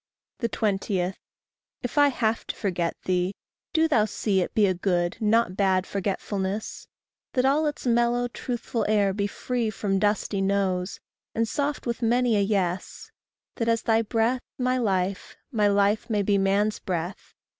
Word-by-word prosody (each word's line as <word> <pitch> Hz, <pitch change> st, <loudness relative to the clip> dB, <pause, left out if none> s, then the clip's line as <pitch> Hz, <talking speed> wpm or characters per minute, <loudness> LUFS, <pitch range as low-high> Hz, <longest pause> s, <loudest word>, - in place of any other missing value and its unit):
20. 195 Hz, -5 st, 0 dB, 0.7 s
If 245 Hz, -, -4 dB
I 290 Hz, -1 st, +6 dB
have 230 Hz, -4 st, 0 dB
to -, -, -4 dB
forget 175 Hz, -4 st, -1 dB
thee, 185 Hz, +1 st, 0 dB, 0.4 s
do 325 Hz, -3 st, +3 dB
thou 225 Hz, -9 st, +3 dB
see 200 Hz, -2 st, 0 dB
It -, -, -3 dB
be 215 Hz, -, +5 dB
a 190 Hz, -, +2 dB
good, 175 Hz, 0 st, 0 dB
not 220 Hz, -3 st, +2 dB
bad 190 Hz, -2 st, +2 dB
forgetfulness; 200 Hz, +1 st, -3 dB, 0.5 s
That 255 Hz, -1 st, +2 dB
all 295 Hz, +3 st, +3 dB
its 295 Hz, -, -4 dB
mellow, 240 Hz, 0 st, +2 dB
truthful 240 Hz, -1 st, -3 dB
air 205 Hz, -2 st, +3 dB
be 200 Hz, 0 st, 0 dB
free 240 Hz, +2 st, -2 dB
From 195 Hz, -2 st, -1 dB
dusty 205 Hz, -1 st, 0 dB
noes, 195 Hz, -1 st, 0 dB, 0.4 s
and 230 Hz, 0 st, +1 dB
soft 285 Hz, +5 st, -2 dB
with 235 Hz, 0 st, -2 dB
many 240 Hz, 0 st, +3 dB
a 205 Hz, -, +3 dB
yes; 195 Hz, -3 st, -1 dB, 0.5 s
That 230 Hz, -2 st, 0 dB
as 230 Hz, 0 st, +1 dB
thy 225 Hz, 0 st, +3 dB
breath 230 Hz, +3 st, +1 dB, 0.2 s
my 255 Hz, 0 st, +1 dB
life, 190 Hz, -4 st, -1 dB
my 210 Hz, -4 st, +3 dB
life 205 Hz, +3 st, +2 dB
may 210 Hz, -2 st, +1 dB
be 200 Hz, 0 st, +2 dB
Man's 200 Hz, +2 st, +1 dB
breath. 180 Hz, 0 st, -4 dB
210 Hz, 155 wpm, -26 LUFS, 195-235 Hz, 0.7 s, I